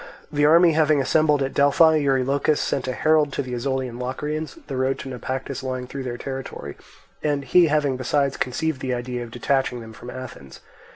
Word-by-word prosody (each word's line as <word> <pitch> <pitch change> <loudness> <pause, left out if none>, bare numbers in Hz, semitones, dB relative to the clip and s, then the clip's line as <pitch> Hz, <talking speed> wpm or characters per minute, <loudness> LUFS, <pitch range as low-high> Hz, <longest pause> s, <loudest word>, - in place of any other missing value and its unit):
The 145 -1 +2
army 170 +2 +6
having 155 -2 +3
assembled 150 +1 +2
at 135 - -3
Delphi, 155 +3 +5
Eurylochus 140 +1 +1
sent 130 - -1
a - - 0
herald 155 +1 +2
to - - -1
the 125 -1 -6
Ozolian 125 -1 -2
Locrians; 150 +5 -4
the 140 -2 -5
road 130 +1 0
to 135 - -7
Naupactus 130 +2 -4
lying 130 -1 -4
through 135 +2 -6
their 125 -2 -4
territory, 130 - -6 0.5
and 145 -2 -1
he 170 +6 +5
having 145 -3 +1
besides 140 +2 0
conceived 130 +3 -2
the 130 -1 -1
idea 125 0 -4
of 120 - -9
detaching 125 +1 0
them 110 -1 -10
from 120 +3 -10
Athens. 125 - -9
135 Hz, 185 wpm, -23 LUFS, 125-150 Hz, 0.5 s, army